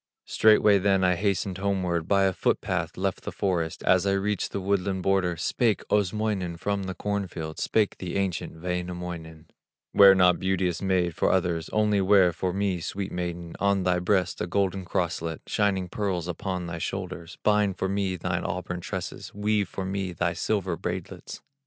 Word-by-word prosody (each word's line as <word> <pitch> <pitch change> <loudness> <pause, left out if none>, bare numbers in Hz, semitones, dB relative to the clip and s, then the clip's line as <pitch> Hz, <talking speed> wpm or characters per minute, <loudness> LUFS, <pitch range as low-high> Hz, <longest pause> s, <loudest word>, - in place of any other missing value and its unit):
Straightway 105 -2 +5
then 95 -1 +2
I 90 0 +4
hastened 95 0 -1
homeward, 90 -4 -1
By 100 0 +3
a 95 -1 +2
foot - - +1
path - - -3
left - - -1
the - - -5
forest; 85 -5 -2
As 95 +1 +3
I 100 - +3
reached 100 +1 -1
the - - -2
woodland 95 -1 -1
border 90 -3 +1
Spake 110 +6 +1
Osmoinen 105 -3 0
from 100 +2 -2
the 95 0 -4
cornfield, 95 -6 -4
Spake 105 -2 +1
the 90 -2 -5
ancient 95 -4 -2
Wainamoinen: 90 -3 -5 0.5
'Wear 100 -1 +8
not, 90 -1 +4
beauteous 95 -2 0
maid, 90 -3 +1
for - - +2
others, 85 -3 0
Only 105 -2 +2
wear 95 -2 +5
for 90 +2 -2
me, 95 -1 -1
sweet 95 +3 -4
maiden, 85 -1 -4
On 100 -1 +2
thy 90 0 +2
breast 90 +1 0
a - - -1
golden 95 0 0
crosslet, 85 -2 -2
Shining 95 -3 0
pearls 90 -3 -2
upon 90 +1 -3
thy 85 -1 -5
shoulders, 90 -2 -5
Bind 105 -2 +2
for 95 - -1
me 95 -1 -1
thine 90 -1 -2
auburn 90 0 -3
tresses, - - -6
Weave 105 -1 0
for 95 - -5
me 95 -1 -3
thy 85 0 0
silver 95 0 -1
braidlets. - - -6
95 Hz, 170 wpm, -26 LUFS, 90-100 Hz, 0.5 s, Wear